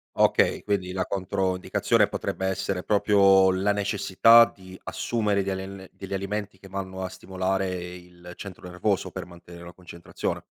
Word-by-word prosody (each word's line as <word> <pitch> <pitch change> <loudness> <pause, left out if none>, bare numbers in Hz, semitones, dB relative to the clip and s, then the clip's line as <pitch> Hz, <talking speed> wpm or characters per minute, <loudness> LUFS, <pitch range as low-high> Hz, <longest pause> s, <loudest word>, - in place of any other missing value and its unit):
Okay, - - +3
quindi 100 -3 -1
la 95 0 -2
controindicazione 95 -1 0
potrebbe 95 - -3
essere 95 -1 -2
proprio 100 -2 +4
la 95 +2 +1
necessità 105 +3 +5
di 95 -1 -13
assumere 105 -4 -1
degli 95 0 -2
al 95 0 -9
degli 95 0 -8
alimenti 100 0 -4
che 95 - -13
vanno 95 -1 -6
a - - -2
stimolare 95 +1 -2 0.3
il 90 0 -13
centro 95 -2 -9
nervoso 90 +2 -1
per - - -6
mantenere 85 0 -13
la 85 - -10
concentrazione. 85 -1 -6
95 Hz, 150 wpm, -25 LUFS, 90-100 Hz, 0.3 s, necessità